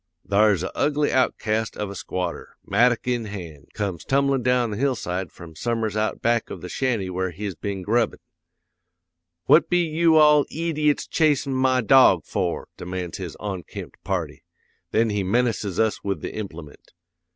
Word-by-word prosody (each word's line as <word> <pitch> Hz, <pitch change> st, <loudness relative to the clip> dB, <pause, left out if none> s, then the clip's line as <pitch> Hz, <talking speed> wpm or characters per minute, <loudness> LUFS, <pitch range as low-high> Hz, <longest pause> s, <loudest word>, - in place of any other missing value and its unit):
"'Thar's 100 Hz, -2 st, +3 dB
a -, -, -5 dB
ugly 145 Hz, 0 st, +1 dB
outcast 110 Hz, -4 st, 0 dB
of 105 Hz, -2 st, -3 dB
a -, -, -8 dB
squatter, 90 Hz, -1 st, -5 dB
mattock 120 Hz, +4 st, +2 dB
in 120 Hz, -2 st, 0 dB
hand, 85 Hz, -8 st, -8 dB
comes 100 Hz, -5 st, -3 dB
tumblin' 140 Hz, -1 st, +1 dB
down 125 Hz, -1 st, +1 dB
the 105 Hz, -, -4 dB
hillside 105 Hz, -, -2 dB
from 80 Hz, -2 st, -12 dB
some'ers 115 Hz, +3 st, -2 dB
out 110 Hz, 0 st, -1 dB
back 115 Hz, -1 st, +1 dB
of -, -, -7 dB
the -, -, -7 dB
shanty 120 Hz, -8 st, -1 dB
where 95 Hz, 0 st, -2 dB
he's 100 Hz, +3 st, -5 dB
been 100 Hz, 0 st, -5 dB
grubbin': 115 Hz, +2 st, +1 dB, 1.3 s
"'"What 155 Hz, -, +5 dB
be 175 Hz, -1 st, +3 dB
you 165 Hz, +1 st, +3 dB
all 150 Hz, -2 st, +6 dB
eediots 155 Hz, -3 st, 0 dB
chasin' 145 Hz, -4 st, +1 dB
my 130 Hz, -1 st, +2 dB
dog 130 Hz, +3 st, +5 dB
for?" 90 Hz, -4 st, -2 dB
demands 90 Hz, -1 st, -5 dB
this -, -, -6 dB
onkempt 95 Hz, -5 st, -7 dB
party. -, -, -3 dB, 0.5 s
Then 110 Hz, 0 st, +2 dB
he 105 Hz, -1 st, 0 dB
menaces 105 Hz, -2 st, 0 dB
us 110 Hz, -1 st, +1 dB
with 100 Hz, -1 st, -2 dB
the -, -, -5 dB
implement. 85 Hz, -8 st, -9 dB
110 Hz, 160 wpm, -24 LUFS, 95-130 Hz, 1.3 s, all